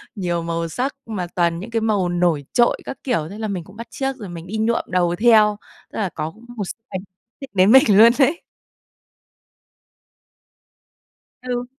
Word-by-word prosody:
nhiều 175 -4 -2
màu 165 0 -3
sắc 255 - -2
mà 195 -6 -4
toàn 170 -1 +1
những 225 +6 -8
cái 225 -1 0
màu 205 -5 +1
nổi 175 -5 +1
trội 240 -1 +3
các - - -6
kiểu, 190 - -1
thế 200 - -9
là 220 - -2
mình 185 -5 -4
cũng 185 - -16
bắt 230 - -8
chước 270 +2 -3
rồi 205 -5 -8
mình 170 0 -8
đi 215 +4 -4
nhuộm 220 +2 +1
đầu 175 -1 +1
theo. 215 0 +4 0.4
Tức - - -4
là 195 - 0
có 160 -1 -5 0.3
một 205 - -2
x - - -3 0.2
ảnh 190 -2 -4 0.4
định 275 - -8
đến 190 +3 +5
mình 265 +1 +8
luôn 230 +2 +8
đấy. 290 +5 +3 3.0
Ừ. 245 -1 -3
205 Hz, 185 wpm, -21 LUFS, 175-235 Hz, 3.0 s, mình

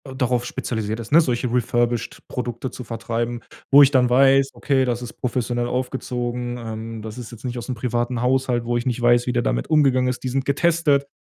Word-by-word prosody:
darauf 125 -2 0
spezialisiert 110 -4 -3
ist, 115 - -10
ne? 160 - +7
Solche 125 -5 0
Refurbished 120 -1 0
Produkte 125 0 -4
zu 125 - -8
vertreiben, 120 +1 -3 0.3
wo 140 +1 +9
ich 135 - +5
dann 125 -3 +3
weiß: 135 +2 +4
“Okay, 135 -2 +1
das 120 -1 -2
ist 120 - -7
professionell 120 -1 -2
aufgezogen, 125 -1 -3
ähm, 115 -1 -6
das 110 +1 -8
ist 125 -1 -8
jetzt 120 -2 -12
nicht 125 -1 -4
aus'm 120 +2 -4
privaten 120 0 -2
Haushalt“, 125 -1 +1
wo 120 0 -1
ich 120 - -3
nicht 125 -1 -1
weiß, 120 0 +4
wie 125 - 0
der 120 - +1
damit - - -1
umgegangen 135 -4 +3
ist. 125 - -4
Die 130 - -2
sind 135 +1 -1
getestet. 145 -1 +2
125 Hz, 205 wpm, -22 LUFS, 120-130 Hz, 0.3 s, wo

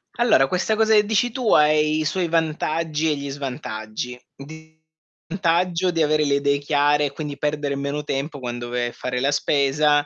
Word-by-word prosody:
Allora, 240 - +3
questa 185 +4 0
cosa 220 0 +3
che 210 -1 +5
dici 220 +3 +1
tu 235 -2 0
ha 150 0 +5
i 155 0 +1
suoi 175 +3 -1
vantaggi 160 -1 -1
e 150 - +1
gli 140 0 -6
svantaggi. 125 -4 -6 0.2
D 160 +3 -13 0.5
vantaggio 180 0 +1
di 165 -2 +1
avere 155 0 +2
le 140 - +1
idee 140 0 +1
chiare 145 0 +2
e 140 - -3
quindi 145 -1 -6
perdere 145 -1 -2
meno 140 +1 -3
tempo 140 +1 -4
quando 120 -1 -5
vai 120 0 -2
a - - -5
fare 125 0 -4
la 140 +2 +2
spesa. 145 +1 +2
150 Hz, 185 wpm, -22 LUFS, 140-165 Hz, 0.5 s, che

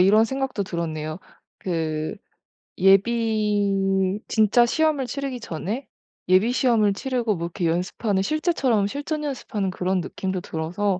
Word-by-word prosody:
이런 210 +4 +6
생각도 265 -4 -2
들었네요. 155 -3 -4 0.4
그 160 -1 -2 0.6
예비 200 -2 +2
진짜 220 +2 +4
시험을 305 +1 +1
치르기 275 0 -4
전에 215 - -4 0.4
예비 190 +6 +5
시험을 230 -6 +3
치르고 240 -2 -1
뭐 170 -1 -3
이렇게 175 +1 -3
연습하는 185 +4 0
실제처럼 265 - +1
실전 290 +6 -3
연습하는 220 -8 -3
그런 185 0 0
느낌도 190 +1 -3
들어서 180 +5 -2
205 Hz, 305 characters per minute, -24 LUFS, 185-240 Hz, 0.6 s, 이런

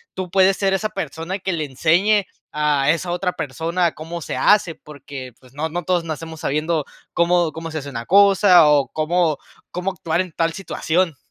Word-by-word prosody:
tú 185 -1 -4
puedes 190 0 +4
ser 195 -1 +1
esa 215 +3 -1
persona 165 +1 -5
que 190 0 -2
le 155 -2 -2
enseñe 175 +10 +2 0.3
a 150 -2 +1
esa 170 +3 0
otra 180 0 -1
persona 165 +4 -1
cómo 165 +2 -7
se - - -5
hace, 195 -5 +3
porque, 140 -5 -10
pues, 130 -1 -20
no 155 +3 -3
no 175 +2 -4
todos 180 -1 0
nacemos 160 0 -6
sabiendo 155 0 -1 0.3
cómo 170 -1 +2
cómo 165 +1 -7
se 155 - -4
hace 140 -1 -8
una 115 -3 -6
cosa 195 -3 +6
o 145 -2 +3
cómo 160 0 +1 0.3
cómo 180 +2 -2
actuar 170 -2 -1
en 185 -2 -6
tal 165 +1 -1
situación. 175 -3 -1
165 Hz, 185 wpm, -21 LUFS, 155-185 Hz, 0.3 s, cosa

